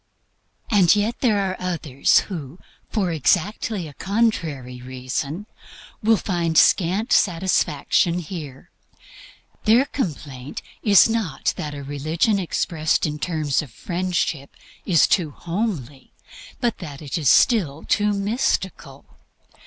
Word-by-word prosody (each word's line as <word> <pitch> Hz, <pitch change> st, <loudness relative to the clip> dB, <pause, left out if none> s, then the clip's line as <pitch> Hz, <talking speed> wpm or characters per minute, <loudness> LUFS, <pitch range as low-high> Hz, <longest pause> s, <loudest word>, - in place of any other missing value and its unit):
And 195 Hz, -3 st, +5 dB
yet 215 Hz, +4 st, -1 dB
there 225 Hz, -5 st, +2 dB
are 190 Hz, -1 st, -1 dB
others 160 Hz, -7 st, +2 dB
who, 160 Hz, -5 st, -7 dB, 0.3 s
for 195 Hz, -6 st, 0 dB
exactly 180 Hz, -, 0 dB
a 145 Hz, -, -11 dB
contrary 160 Hz, -, -1 dB
reason, 130 Hz, +8 st, -4 dB, 0.6 s
will 225 Hz, 0 st, +4 dB
find 170 Hz, -5 st, -1 dB
scant 195 Hz, +6 st, +3 dB
satisfaction 175 Hz, -2 st, +2 dB
here. 155 Hz, -4 st, -8 dB, 0.9 s
Their 230 Hz, +5 st, +5 dB
complaint 145 Hz, -, -5 dB, 0.2 s
is 200 Hz, -3 st, +6 dB
not 225 Hz, -10 st, -1 dB
that 150 Hz, -1 st, -5 dB
a 140 Hz, -, -7 dB
religion 155 Hz, +9 st, 0 dB
expressed 160 Hz, -3 st, 0 dB
in 150 Hz, 0 st, -3 dB
terms 155 Hz, -4 st, 0 dB
of 150 Hz, -, -10 dB
Friendship 170 Hz, -1 st, -3 dB, 0.3 s
is 170 Hz, -5 st, +5 dB
too 170 Hz, -6 st, +1 dB
homely, 165 Hz, -, -4 dB, 0.5 s
but 240 Hz, -2 st, -1 dB
that 150 Hz, -4 st, -8 dB
it 140 Hz, -, -5 dB
is 150 Hz, -7 st, +2 dB
still 165 Hz, -, +3 dB
too 210 Hz, -1 st, +2 dB
mystical. 200 Hz, -1 st, -2 dB
170 Hz, 115 wpm, -22 LUFS, 145-205 Hz, 0.9 s, is